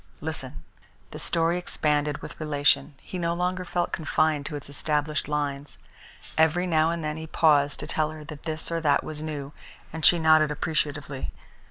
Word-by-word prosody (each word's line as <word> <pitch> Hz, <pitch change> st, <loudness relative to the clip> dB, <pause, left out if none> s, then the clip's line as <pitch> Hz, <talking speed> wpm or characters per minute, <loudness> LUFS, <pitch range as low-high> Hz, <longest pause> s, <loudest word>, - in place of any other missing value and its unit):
Listen." 75 Hz, +1 st, -5 dB, 0.5 s
The -, -, -7 dB
story 170 Hz, +1 st, +1 dB
expanded 150 Hz, -4 st, 0 dB
with -, -, -9 dB
relation. 145 Hz, -2 st, +2 dB
He 185 Hz, -, -6 dB
no 170 Hz, 0 st, 0 dB
longer 180 Hz, +1 st, -1 dB
felt 175 Hz, 0 st, -1 dB
confined 155 Hz, -2 st, +1 dB
to 150 Hz, -, -5 dB
its 145 Hz, -, -7 dB
established 150 Hz, +1 st, -1 dB
lines. 145 Hz, -1 st, -3 dB, 0.6 s
Every 160 Hz, +3 st, +4 dB
now 160 Hz, -2 st, +3 dB
and 170 Hz, -1 st, -2 dB
then 150 Hz, 0 st, -2 dB
he 160 Hz, 0 st, -6 dB
paused 145 Hz, -3 st, +3 dB
to -, -, -4 dB
tell 155 Hz, -1 st, 0 dB
her 155 Hz, -1 st, -8 dB
that 150 Hz, 0 st, -9 dB
this 160 Hz, +1 st, -3 dB
or 165 Hz, 0 st, -1 dB
that 145 Hz, -3 st, +3 dB
was 155 Hz, -1 st, -6 dB
new, 145 Hz, -2 st, -5 dB, 0.4 s
and 160 Hz, 0 st, -5 dB
she 175 Hz, -, +8 dB
nodded 155 Hz, -2 st, +5 dB
appreciatively. 145 Hz, -2 st, -2 dB
155 Hz, 175 wpm, -26 LUFS, 145-160 Hz, 0.6 s, she